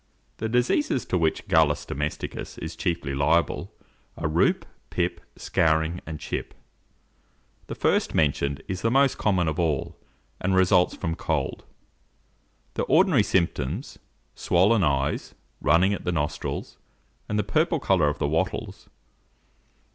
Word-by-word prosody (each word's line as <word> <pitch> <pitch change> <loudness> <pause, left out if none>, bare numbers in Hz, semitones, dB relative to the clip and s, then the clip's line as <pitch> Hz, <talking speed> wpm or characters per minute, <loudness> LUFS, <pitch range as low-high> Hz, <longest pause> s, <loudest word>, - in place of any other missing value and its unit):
The 110 - -3
diseases 125 - +1
to 90 - 0
which 80 -1 0
Gallus 80 -2 +3
domesticus 75 +2 -4
is - - -6
chiefly 85 -5 -2
liable, 80 +5 +1 0.5
are - - -1
roup, 80 +2 +2 0.2
pip, 85 -1 -1
scouring, 80 +1 +1
and 80 -1 -5
chip. - - -5 1.1
The - - -5
first - - +1
mentioned 70 -2 +1
is 95 -1 -4
the 115 - +2
most 135 +2 +3
common 95 -5 +2
of 80 +2 -2
all, 80 -5 -1 0.4
and 95 +1 0
results 90 -1 +4
from 80 - -3
cold. 80 -4 -2 1.1
The - - -2
ordinary 160 - +4
symptoms, 90 - -1 0.3
swollen 95 +4 +3
eyes, 70 -2 0 0.3
running 90 +6 +4
at 100 - -5
the 90 - -1
nostrils, 75 -4 -3 0.5
and 105 - 0
the 105 - +2
purple 160 - +1
colour 90 - +3
of 75 - -3
the - - 0
wattles. 80 +2 -2
85 Hz, 130 wpm, -25 LUFS, 75-100 Hz, 1.1 s, results